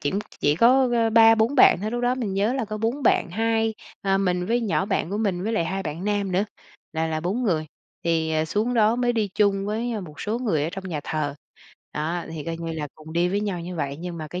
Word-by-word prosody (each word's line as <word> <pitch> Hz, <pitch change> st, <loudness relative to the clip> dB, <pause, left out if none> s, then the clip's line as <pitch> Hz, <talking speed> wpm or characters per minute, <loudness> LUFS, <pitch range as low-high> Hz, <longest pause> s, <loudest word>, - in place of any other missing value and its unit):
kiểm 155 Hz, +7 st, -1 dB
ch -, -, -9 dB
chỉ -, -, -17 dB
chỉ 145 Hz, +1 st, +3 dB
có, 255 Hz, +7 st, +5 dB
ơ, 230 Hz, -1 st, +2 dB
3-4 225 Hz, +3 st, +5 dB
bạn 250 Hz, -, +7 dB
thôi, 215 Hz, +2 st, -2 dB
lúc 240 Hz, 0 st, -2 dB
đó 245 Hz, +1 st, +2 dB
mình 220 Hz, -7 st, -3 dB
nhớ 205 Hz, +4 st, +1 dB
là 260 Hz, -3 st, -1 dB
có 215 Hz, 0 st, -5 dB
4 235 Hz, +6 st, -1 dB
bạn 185 Hz, -, +3 dB
2, 225 Hz, +2 st, +1 dB, 0.3 s
à, 195 Hz, -1 st, +2 dB
mình 180 Hz, -2 st, 0 dB
với 240 Hz, +2 st, +1 dB
nhỏ 205 Hz, -3 st, 0 dB
bạn 190 Hz, -4 st, -1 dB
của 205 Hz, -, -2 dB
mình 190 Hz, -5 st, 0 dB
với 220 Hz, -, -1 dB
lại 170 Hz, -7 st, +1 dB
2 195 Hz, +2 st, -2 dB
bạn 160 Hz, +3 st, -5 dB
nam 205 Hz, -2 st, 0 dB
nữa, 190 Hz, +3 st, +2 dB, 0.5 s
là 160 Hz, 0 st, 0 dB
là 155 Hz, -1 st, -2 dB
4 195 Hz, +9 st, -1 dB
người. 160 Hz, -8 st, 0 dB, 0.4 s
Thì, 160 Hz, -1 st, +1 dB
à, 155 Hz, 0 st, +1 dB
xuống 215 Hz, +9 st, -1 dB
đó 220 Hz, +1 st, +4 dB
mới 245 Hz, -1 st, +1 dB
đi 215 Hz, -3 st, 0 dB
chung 200 Hz, -1 st, +2 dB
với, 230 Hz, +3 st, -2 dB
ơ, 215 Hz, -, -3 dB
một 155 Hz, -6 st, -10 dB
số 220 Hz, +3 st, -2 dB
người 170 Hz, -, 0 dB
ở 160 Hz, -, -1 dB
trong 190 Hz, -1 st, -6 dB
nhà 155 Hz, -4 st, -3 dB
thờ. 145 Hz, -2 st, -2 dB, 0.6 s
Đó, 165 Hz, +3 st, -2 dB
thì 155 Hz, -3 st, -6 dB
coi 165 Hz, 0 st, -3 dB
như 165 Hz, -1 st, -5 dB
là 150 Hz, -2 st, -4 dB
cùng 155 Hz, +1 st, -12 dB
đi 175 Hz, +1 st, +2 dB
với 200 Hz, +3 st, 0 dB
nhau 195 Hz, -5 st, -2 dB
như 175 Hz, +1 st, -6 dB
vậy, 140 Hz, -2 st, -2 dB
nhưng 175 Hz, 0 st, -6 dB
mà 155 Hz, -, -5 dB
cái 180 Hz, +4 st, -5 dB
195 Hz, 270 wpm, -24 LUFS, 165-225 Hz, 0.6 s, bạn